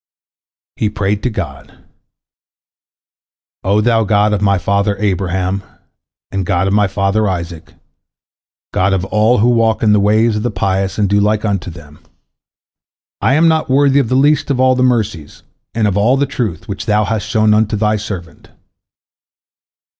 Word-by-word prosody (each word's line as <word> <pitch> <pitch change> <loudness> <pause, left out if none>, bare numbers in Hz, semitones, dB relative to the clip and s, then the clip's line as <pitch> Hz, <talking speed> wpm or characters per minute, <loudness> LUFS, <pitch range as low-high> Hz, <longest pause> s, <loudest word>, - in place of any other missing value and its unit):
He 105 - 0
prayed 105 0 -2
to 125 - -1
God: 110 - -7 1.9
"O 100 +3 +2
Thou 115 0 +2
God 105 0 +2
of 105 - -1
my 100 -1 +2
father 100 +3 0
Abraham, 95 -1 -1 0.7
and 95 -1 -2
God 90 +1 0
of 95 - 0
my 105 -1 +3
father 100 +2 0
Isaac, 85 -2 -6 1.0
God 95 +1 +1
of 95 -1 -1
all 110 +5 +2
who 115 +4 +3
walk 115 -2 +1
in 105 -1 +4
the 105 - +3
ways 110 +2 +2
of - - -3
the 120 - -1
pious 95 -1 -2
and 105 -2 +1
do 100 +1 +2
like 105 +1 0
unto 100 -4 -2
them! 75 -3 -13 1.2
I 135 - +2
am 165 +2 +4
not 160 -2 +1
worthy 140 +1 +3
of 125 -5 -1
the 130 - +1
least 145 +2 +2
of 135 -3 0
all 130 0 +4
the 125 - -1
mercies, 110 - -1 0.3
and 110 -2 +1
of 100 - -1
all 115 +6 +2
the 140 - +1
truth, 115 - -4
which 100 +3 -6
Thou 105 0 +2
hast 110 0 -3
showed 110 -1 +2
unto 110 0 +1
Thy 105 +1 +1
servant. 95 -6 -8
105 Hz, 170 wpm, -15 LUFS, 95-115 Hz, 1.9 s, in